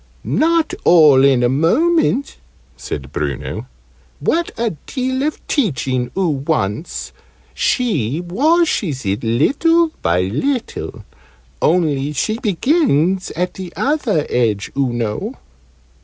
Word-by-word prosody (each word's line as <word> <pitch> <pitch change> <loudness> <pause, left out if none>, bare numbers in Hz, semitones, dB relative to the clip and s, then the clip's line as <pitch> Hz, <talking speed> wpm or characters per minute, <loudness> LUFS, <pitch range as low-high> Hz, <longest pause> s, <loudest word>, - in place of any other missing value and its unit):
"Not 330 0 +1
all 150 -6 +6
in 135 -3 +4
a - - +4
moment," 270 - +1 0.4
said - - -6
Bruno. - - -4 0.5
"What 340 +1 0
a 230 -1 0 0.2
deal 260 0 -2
of 300 +2 -3
teaching 135 - -1
oo 190 -2 +2
wants! 110 - -2 0.4
She 150 - 0
washes 200 - +1
it 100 +3 -1
little 310 - +2
by 90 +1 +2
little 225 - -3 0.6
only 150 -4 +1
she 215 - -1
begins 190 - +1
at 180 +2 -1
the 185 -2 -8
other 250 - 0
edge, 110 -5 0
oo 135 -3 +1
know." 115 -3 -3
170 Hz, 110 wpm, -18 LUFS, -, 0.6 s, all